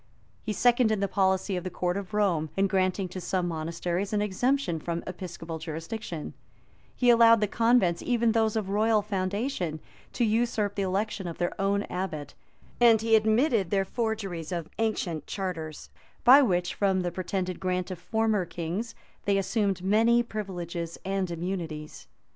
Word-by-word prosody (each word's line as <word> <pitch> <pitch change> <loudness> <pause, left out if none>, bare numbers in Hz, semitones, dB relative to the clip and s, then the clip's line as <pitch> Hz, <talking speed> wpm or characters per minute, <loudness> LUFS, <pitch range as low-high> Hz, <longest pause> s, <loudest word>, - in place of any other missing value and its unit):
He 220 - -4
seconded 235 0 +3
the 200 - +1
policy 190 0 +1
of 180 - -3
the 185 - -3
court 180 0 -1
of 200 -1 -5
Rome, 185 -7 +1
in 195 - +3
granting 190 0 +1
to 185 +1 -6
some 180 0 -1
monasteries 170 +3 -2
an 210 - +2
exemption 210 -1 0
from 170 +2 -3
episcopal 170 -3 -6
jurisdiction; 165 +1 -6 0.6
he 245 -1 +4
allowed 230 -1 +7
the 210 - +2
convents, 225 -6 +2
even 235 -2 +2
those 220 -1 +1
of 210 -3 -1
royal 215 +1 +3
foundation, 195 - -2 0.3
to 240 - +1
usurp 220 -2 +1
the 200 - -2
election 195 0 -1
of 170 - -6
their 175 - -1
own 200 +1 +1
abbot; 180 -7 -5 0.5
and 230 -2 +6
he 225 0 +4
admitted 220 - +3
their 195 0 +1
forgeries 195 -7 -3
of 170 -3 -3
ancient 190 -8 -1
charters, 165 -6 -5 0.3
by 265 +4 +9
which, 180 -8 +1
from 195 -2 +1
the 175 -1 -2
pretended 185 0 -3
grant 185 0 -2
of 180 - -6
former 220 0 +1
kings, 175 +7 -4 0.3
they 200 -1 +2
assumed 195 -2 0
many 225 +5 +4
privileges 175 -6 -5
and 195 -1 -1
immunities. 165 -3 -5
195 Hz, 160 wpm, -28 LUFS, 175-220 Hz, 0.6 s, by